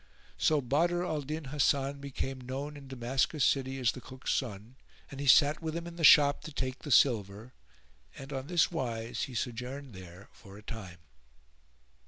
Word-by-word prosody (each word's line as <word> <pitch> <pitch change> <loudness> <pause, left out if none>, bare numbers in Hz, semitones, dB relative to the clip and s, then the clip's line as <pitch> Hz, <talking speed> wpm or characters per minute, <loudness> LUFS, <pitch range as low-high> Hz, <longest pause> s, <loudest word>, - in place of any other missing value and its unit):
So 155 -2 +3
Badr 170 +7 +1
al 155 -4 -2
Din 155 +3 -5
Hasan 140 -1 +1
became 135 -1 -5
known 135 +4 -5
in 140 -1 -11
Damascus 130 +3 0
city 135 -1 0
as 125 -4 +2
the 130 - -10
Cook's 130 +3 -4
son 115 -1 -4 0.4
and 135 - -8
he 140 - -3
sat 145 +3 +6
with 160 -1 -4
him 170 0 -4
in 170 0 -8
the 170 - -5
shop 145 -1 +7
to 155 - -7
take 130 -2 -4
the 150 - -8
silver, 110 -3 +2 0.6
and 135 +1 -8
on 135 0 -4
this 175 0 +2
wise 115 -7 -3
he 130 - -10
sojourned 125 +3 -5
there 95 +1 -12
for 100 -2 -14
a 105 - -14
time. 95 -6 -8
135 Hz, 180 wpm, -30 LUFS, 120-145 Hz, 0.6 s, shop